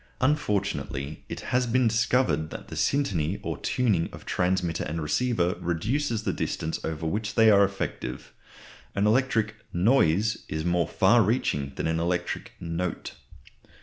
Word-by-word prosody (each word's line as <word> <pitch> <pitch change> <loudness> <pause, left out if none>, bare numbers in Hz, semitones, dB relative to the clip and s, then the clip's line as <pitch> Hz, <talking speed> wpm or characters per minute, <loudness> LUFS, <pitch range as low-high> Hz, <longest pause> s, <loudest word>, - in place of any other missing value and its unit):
Unfortunately, 100 - -1
it - - -5
has 125 0 +2
been 125 +1 +3
discovered 110 - +1
that - - -9
the - - -7
syntony 95 - 0
or - - -2
tuning 105 -10 +1
of - - -11
transmitter 90 -2 0
and 80 +2 -3
receiver 90 +3 +1
reduces 110 - -1
the - - 0
distance 80 +1 -3
over 80 0 -3
which 105 +6 -2
they 110 -1 +6
are 100 -1 +6
effective. 95 -11 -4 0.6
An 100 - +2
electric 110 -2 +2
"noise" 105 0 +3
is 80 +1 -3
more 85 -1 +2
far 115 +5 +4
reaching 85 - 0
than - - -3
an 80 0 0
electric 85 +1 -2
"note." 85 +2 -4
95 Hz, 145 wpm, -27 LUFS, 80-115 Hz, 0.6 s, they